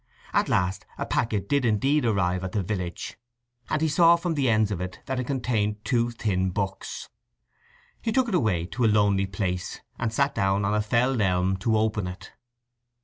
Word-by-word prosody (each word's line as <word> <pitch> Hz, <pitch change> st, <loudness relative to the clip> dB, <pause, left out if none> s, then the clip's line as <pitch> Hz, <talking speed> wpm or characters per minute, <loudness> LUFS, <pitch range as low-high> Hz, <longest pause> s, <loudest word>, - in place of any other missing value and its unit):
At -, -, +2 dB
last 95 Hz, +1 st, +1 dB
a -, -, -2 dB
packet 105 Hz, -5 st, -1 dB
did 140 Hz, +2 st, +2 dB
indeed 130 Hz, +6 st, +2 dB
arrive 95 Hz, -4 st, +1 dB
at 95 Hz, -, -4 dB
the 105 Hz, -, 0 dB
village, 90 Hz, -2 st, -4 dB, 0.5 s
and 155 Hz, +1 st, 0 dB
he -, -, +3 dB
saw 165 Hz, +3 st, +6 dB
from 170 Hz, 0 st, -2 dB
the 140 Hz, -5 st, +1 dB
ends 110 Hz, -2 st, +3 dB
of 90 Hz, -, -3 dB
it 90 Hz, 0 st, -5 dB
that 130 Hz, -1 st, -2 dB
it 125 Hz, -, -3 dB
contained 110 Hz, -6 st, -1 dB
two 120 Hz, -2 st, +1 dB
thin 95 Hz, -5 st, -1 dB
books. 95 Hz, +1 st, -4 dB, 0.9 s
He 225 Hz, -, -1 dB
took 255 Hz, +2 st, +2 dB
it 225 Hz, -, -3 dB
away 110 Hz, -, +2 dB
into 95 Hz, +9 st, -3 dB
a -, -, +5 dB
lonely 100 Hz, -2 st, +3 dB
place, 95 Hz, -1 st, -3 dB, 0.2 s
and 115 Hz, -1 st, -1 dB
sat 140 Hz, +4 st, +1 dB
down 95 Hz, +1 st, +1 dB
on 100 Hz, -, +1 dB
a 105 Hz, -, +2 dB
felled 120 Hz, +3 st, +1 dB
elm 95 Hz, -1 st, +2 dB
to 110 Hz, +3 st, +1 dB
open 110 Hz, -3 st, 0 dB
it. 90 Hz, +1 st, -9 dB
105 Hz, 195 wpm, -26 LUFS, 95-125 Hz, 0.9 s, saw